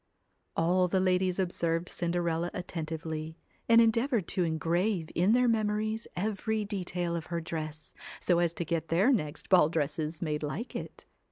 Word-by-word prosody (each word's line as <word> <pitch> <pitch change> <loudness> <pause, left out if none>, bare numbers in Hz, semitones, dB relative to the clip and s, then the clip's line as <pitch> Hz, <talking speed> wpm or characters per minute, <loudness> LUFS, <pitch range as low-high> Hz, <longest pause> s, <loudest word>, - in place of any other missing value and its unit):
All 180 +2 +3
the 190 +1 +1
ladies 185 -1 +2
observed 170 -2 0
Cinderella 170 -1 -1
attentively, 160 -2 -5 0.3
and 230 0 +8
endeavoured 230 - +3
to 185 - +1
engrave 165 +2 0
in 185 +6 +3
their 250 0 +4
memories 215 0 0
every 215 +2 -1
detail 180 -4 -2
of 165 -2 -4
her 170 -1 -2
dress, 155 -2 -5 0.3
so 175 -2 +2
as 170 -1 +2
to 170 - -2
get 165 0 -1
their 190 - +4
next 150 - -2
ball 175 -5 +6
dresses 155 0 -2
made 150 -3 -2
like 175 - -4
it. - - -7
175 Hz, 155 wpm, -30 LUFS, 160-200 Hz, 0.3 s, and